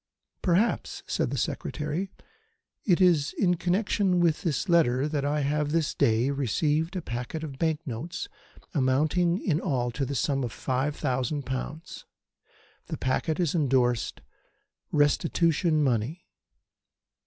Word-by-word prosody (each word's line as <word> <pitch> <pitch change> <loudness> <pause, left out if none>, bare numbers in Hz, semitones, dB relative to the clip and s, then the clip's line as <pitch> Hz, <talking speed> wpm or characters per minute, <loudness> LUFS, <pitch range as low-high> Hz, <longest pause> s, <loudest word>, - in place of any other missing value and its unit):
"Perhaps," 190 +6 +1
said - - -1
the - - -3
Secretary, 155 +6 -2 0.8
"it 180 -4 +4
is 170 -6 +4
in 180 -3 +3
connection 180 +1 +1
with 170 -3 +2
this 165 +2 -1
letter 150 -6 +3
that 150 -2 -1
I 145 +1 0
have 145 +1 0
this 160 -1 0
day 115 +4 +2
received 150 - 0
a 180 - -3
packet 125 +6 -4
of 135 -4 -7
bank 160 -2 +1
notes 140 +7 -5 0.5
amounting 155 +6 +2
in 165 -5 0
all 125 -8 0
to 135 +4 -3
the 140 +1 -3
sum 135 +2 0
of 120 - -3
five 135 +5 -1
thousand 130 0 -1
pounds. 135 +5 -5 0.8
The - - -4
packet 155 +5 -1
is 170 -5 +1
endorsed 130 - +1 0.7
'Restitution 155 +2 +2
money.'" 130 +6 -1
150 Hz, 130 wpm, -27 LUFS, 130-170 Hz, 0.8 s, it